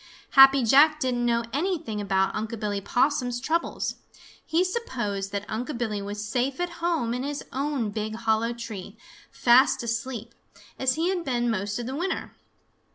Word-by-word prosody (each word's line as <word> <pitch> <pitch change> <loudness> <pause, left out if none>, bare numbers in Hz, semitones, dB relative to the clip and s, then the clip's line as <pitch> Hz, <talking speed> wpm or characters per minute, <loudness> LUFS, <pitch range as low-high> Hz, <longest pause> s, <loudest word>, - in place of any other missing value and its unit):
Happy 270 -1 +8
Jack 295 +6 +5
didn't 245 -3 0
know 235 0 +2
anything 295 - -1
about 190 -1 +1
Unc' 220 +1 -4
Billy 205 -2 -2
Possum's 245 +2 +1
troubles. 320 +6 -1 0.5
He 330 +3 +1
supposed 240 - -3
that 200 0 -3
Unc' 235 +5 -4
Billy 215 -4 -2
was 205 +1 -5
safe 255 +5 -1
at 355 -1 -3
home 325 -9 0
in 250 - -2
his 285 +1 -4
own 270 -5 -1
big 215 +1 -3
hollow 225 0 +1
tree, 225 -3 -7 0.3
fast 245 +1 +4
asleep, 235 0 -4 0.5
as 255 -1 +2
he 330 +3 0
had 370 -2 -1
been 240 -4 0
most 200 -1 -2
of 240 - -4
the 260 +2 -4
winter. 360 +5 -3
240 Hz, 160 wpm, -26 LUFS, 220-280 Hz, 0.5 s, Happy